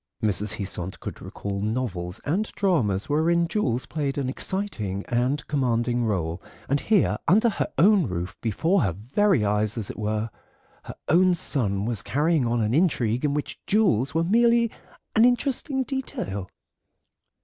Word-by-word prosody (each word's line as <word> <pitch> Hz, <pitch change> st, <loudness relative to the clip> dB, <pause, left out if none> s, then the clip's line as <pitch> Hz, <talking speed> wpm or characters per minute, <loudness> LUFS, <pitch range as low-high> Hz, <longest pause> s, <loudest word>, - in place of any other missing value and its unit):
Mrs. 105 Hz, 0 st, 0 dB
Heasant 95 Hz, -3 st, -5 dB
could -, -, -7 dB
recall 100 Hz, -1 st, -5 dB
novels 100 Hz, -6 st, -3 dB
and 190 Hz, +9 st, -1 dB
dramas 120 Hz, -, +1 dB
wherein 170 Hz, +3 st, +2 dB
jewels 130 Hz, -, -1 dB
played 145 Hz, -3 st, -3 dB
an 135 Hz, -2 st, -1 dB
exciting 125 Hz, -, -3 dB
and 125 Hz, +4 st, 0 dB
commanding 120 Hz, -3 st, 0 dB
role, 85 Hz, -5 st, -2 dB, 0.3 s
and 140 Hz, +2 st, +1 dB
here, 210 Hz, +2 st, +2 dB
under 220 Hz, +6 st, +5 dB
her -, -, -2 dB
own 190 Hz, -, +5 dB
roof, 90 Hz, 0 st, -4 dB
before 160 Hz, -, +1 dB
her 95 Hz, -5 st, 0 dB
very 130 Hz, -, +1 dB
eyes 105 Hz, +2 st, 0 dB
as 110 Hz, -4 st, -3 dB
it -, -, -11 dB
were, 110 Hz, +1 st, -2 dB, 0.5 s
her -, -, -8 dB
own 180 Hz, +2 st, +4 dB
son 105 Hz, -, -1 dB
was 115 Hz, -2 st, -2 dB
carrying 150 Hz, -2 st, +1 dB
on 120 Hz, 0 st, +1 dB
an 110 Hz, +1 st, 0 dB
intrigue 130 Hz, -7 st, +1 dB
in 145 Hz, -1 st, +1 dB
which 150 Hz, -, -4 dB
jewels 155 Hz, -, +2 dB
were 165 Hz, -, +3 dB
merely 235 Hz, +4 st, +3 dB, 0.4 s
an 220 Hz, -, +6 dB
interesting 265 Hz, +2 st, +1 dB
detail. 100 Hz, -, -4 dB
130 Hz, 150 wpm, -25 LUFS, -, 0.5 s, an